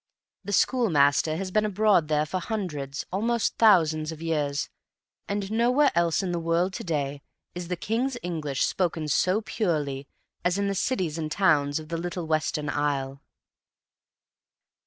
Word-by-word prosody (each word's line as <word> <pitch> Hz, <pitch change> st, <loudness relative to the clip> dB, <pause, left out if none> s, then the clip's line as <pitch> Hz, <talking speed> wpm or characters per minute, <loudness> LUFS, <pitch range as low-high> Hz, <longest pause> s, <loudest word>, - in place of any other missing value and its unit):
The 205 Hz, -, -5 dB
schoolmaster 160 Hz, -, +3 dB
has 190 Hz, +1 st, -4 dB
been 215 Hz, +2 st, +2 dB
abroad 210 Hz, -5 st, +3 dB
there 150 Hz, 0 st, +1 dB
for 185 Hz, +4 st, -3 dB
hundreds, 155 Hz, -10 st, -4 dB
almost 230 Hz, +4 st, 0 dB
thousands, 160 Hz, -8 st, +4 dB
of 160 Hz, -, -8 dB
years, 150 Hz, -3 st, -1 dB, 0.6 s
and 200 Hz, 0 st, -3 dB
nowhere 250 Hz, +6 st, +3 dB
else 170 Hz, +2 st, +2 dB
in 185 Hz, -, -2 dB
the 175 Hz, -, -1 dB
world 170 Hz, +3 st, 0 dB
to -, -, -5 dB
day 145 Hz, -4 st, -2 dB, 0.3 s
is 175 Hz, -1 st, -6 dB
the 180 Hz, -, -2 dB
king's 240 Hz, +7 st, -1 dB
English 155 Hz, -6 st, -2 dB
spoken 165 Hz, -4 st, -1 dB
so 185 Hz, +7 st, +2 dB
purely 150 Hz, -, -2 dB, 0.4 s
as 180 Hz, +1 st, +1 dB
in 200 Hz, 0 st, 0 dB
the 200 Hz, -, 0 dB
cities 185 Hz, -6 st, -1 dB
and 155 Hz, -1 st, -3 dB
towns 150 Hz, -6 st, +2 dB
of 155 Hz, -1 st, -11 dB
the 165 Hz, -, -2 dB
little 175 Hz, 0 st, -4 dB
Western 155 Hz, -1 st, -1 dB
Isle. 140 Hz, -2 st, -1 dB
170 Hz, 155 wpm, -26 LUFS, 150-200 Hz, 0.6 s, thousands